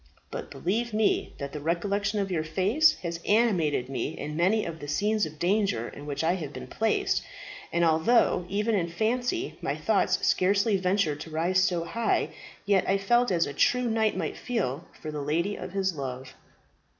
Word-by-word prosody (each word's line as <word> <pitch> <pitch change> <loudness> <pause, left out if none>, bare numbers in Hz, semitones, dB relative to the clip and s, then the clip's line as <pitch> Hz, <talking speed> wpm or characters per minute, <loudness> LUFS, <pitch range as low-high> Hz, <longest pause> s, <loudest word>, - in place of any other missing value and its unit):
But - - -6
believe 220 +5 -2
me 215 -1 +1
that 140 0 -5
the 150 - -4
recollection 200 +6 -1
of 195 -1 -2
your 160 -3 0
face 200 - +3
has 170 -1 -3
animated 185 - +2
me 135 - -3
in 150 0 -5
many 190 +7 +2
of 165 -1 -6
the 145 - -7
scenes 205 +6 +1
of 155 0 -12
danger 175 - +1
in 145 +1 -10
which 145 +1 -2
I 165 +2 +3
have 160 -7 -4
been - - -7
placed; 225 0 0 0.5
and 170 0 +2
although 175 +3 +3
even 210 +3 0
in 180 -5 +1
fancy 245 - -1
my - - -1
thoughts - - +2
scarcely 200 +3 +3
ventured 185 -5 +1
to 160 - -8
rise 170 +4 +1
so 175 -3 +1
high, 225 +7 0 0.4
yet 200 -2 +3
I 195 - +3
felt 240 +5 +2
as 170 -3 +2
a 145 - -5
true 250 - +2
knight 220 -1 +1
might - - -3
feel 175 - -2
for 155 - -6
the 150 -1 -4
lady 170 +8 0
of - - -7
his 190 -1 0
love." 130 -2 -6
185 Hz, 185 wpm, -27 LUFS, 155-210 Hz, 0.5 s, face